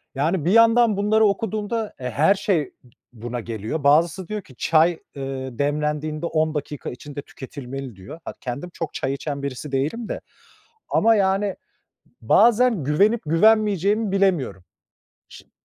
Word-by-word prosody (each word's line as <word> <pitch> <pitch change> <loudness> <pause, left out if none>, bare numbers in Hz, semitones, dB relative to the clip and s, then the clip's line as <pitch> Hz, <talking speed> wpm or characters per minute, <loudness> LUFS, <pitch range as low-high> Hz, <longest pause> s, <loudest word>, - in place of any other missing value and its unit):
Yani, 155 +3 0
bir 175 - +2
yandan 230 -1 +5
bunları 215 +2 +3
okuduğumda, 215 +2 -1
e, 125 -1 -4
her 155 - +3
şey 175 -8 -1 0.4
buna 120 +1 -5
geliyor. 115 +5 -4
Bazısı 165 +5 +3
diyor 215 -1 -4
ki 135 -8 -18
çay, 165 +1 +3 0.2
ııı, 130 -2 -5
demlendiğinde 150 +2 -1
10 155 -1 0
dakika 150 -1 -4
içinde 145 +3 -8
tüketilmeli 135 -3 -8
diyor. 95 - -11
Ha, - - -5
kendim 135 +7 -5
çok 165 - -5
çay 135 - -2
içen 140 0 -5
birisi 140 +1 -5
değilim 150 - -2
de - - -4 0.7
ama 225 +1 +4
yani 195 0 +1 0.7
bazen 225 - +4
güvenip 200 - +3
güvenmeyeceğimi 205 +3 +3
bilemiyorum. 170 - +1 0.6
Şi - - -15
160 Hz, 140 wpm, -23 LUFS, 140-205 Hz, 0.7 s, yandan